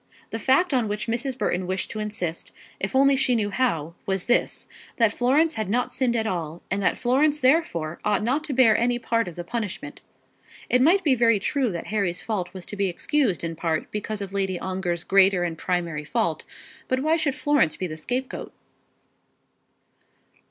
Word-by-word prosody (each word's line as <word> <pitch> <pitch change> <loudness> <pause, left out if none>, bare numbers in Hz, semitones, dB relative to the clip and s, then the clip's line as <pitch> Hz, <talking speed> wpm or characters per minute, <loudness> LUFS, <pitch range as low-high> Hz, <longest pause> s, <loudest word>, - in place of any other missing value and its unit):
The 225 - -3
fact 275 +8 +3
on 245 -4 +2
which 210 0 -3
Mrs. 245 +3 -2
Burton 180 -7 -1
wished 190 0 -1
to 215 - -5
insist, 210 -6 -3 0.3
if 195 +6 -3
only 275 +1 +5
she 255 -2 +2
knew 205 -3 0
how, 170 - 0
was 190 -2 -1
this, 245 - +1 0.3
that 225 -3 +3
Florence 290 +7 +2
had 215 -7 -3
not 245 +4 0
sinned 250 -3 +1
at 220 -1 0
all, 170 -5 -4
and 195 +1 0
that - - +1
Florence 285 +5 +2
therefore 255 - +1
ought 210 0 +1
not 265 +7 0
to 300 - -3
bear 245 -4 +5
any 240 +1 +1
part 230 -3 0
of 175 - -7
the 175 - -5
punishment. 215 0 -5 0.7
It 250 - +4
might 360 +8 +4
be 290 -5 +4
very 230 -3 +4
true 255 +4 0
that 170 - -5
Harry's 190 -5 0
fault 200 -6 -3
was 185 -2 -9
to - - -7
be 200 -1 +1
excused 265 - 0
in 165 0 -3
part 160 -1 -2
because 210 0 -4
of 195 0 -8
Lady 190 -2 0
Ongar's 180 -2 -3
greater 195 -2 +4
and 170 -2 -2
primary 170 -4 -2
fault; 155 +1 -1 0.4
but 260 0 0
why 310 +3 +2
should 300 -4 0
Florence 290 - +2
be 185 - -4
the 155 -3 -5
scapegoat? 250 +11 -4
215 Hz, 190 wpm, -24 LUFS, 180-255 Hz, 0.7 s, only